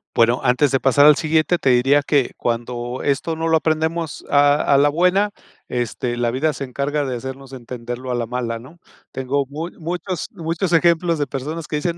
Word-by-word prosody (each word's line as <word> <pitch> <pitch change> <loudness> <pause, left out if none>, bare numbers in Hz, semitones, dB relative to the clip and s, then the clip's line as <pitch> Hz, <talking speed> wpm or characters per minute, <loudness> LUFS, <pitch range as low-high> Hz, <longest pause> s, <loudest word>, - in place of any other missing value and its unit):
Bueno, 115 +1 +3
antes 130 +3 +3
de 135 - +2
pasar 135 +2 +4
al 150 0 +8
siguiente, 160 +3 +1
te 135 - +1
diría 135 +4 +4
que 140 -2 +1
cuando 120 +1 -3
esto 145 +3 0
no 160 +1 -2
lo 160 0 +4
aprendemos 160 0 -2
a 145 0 +5 0.2
a - - +6
la 145 +1 +4
buena, 180 +6 +2 0.4
este, 120 0 -3
la 120 -1 0
vida 145 +6 0
se 140 - -6
encarga 140 +3 -2
de 130 -2 -3
hacernos 130 +2 -8
entenderlo 125 0 -7
a - - 0
la 120 -1 -1
mala, 120 -1 -3
¿no? 135 +9 -14 0.3
Tengo 135 +2 -1
mu 155 +5 -5
muchos 175 +1 -4
muchos 165 +2 -3
ejemplos 170 0 +3
de 145 - 0
personas 150 +4 -5
que - - -3
dicen: 165 +3 -2
145 Hz, 195 wpm, -20 LUFS, 125-160 Hz, 0.4 s, al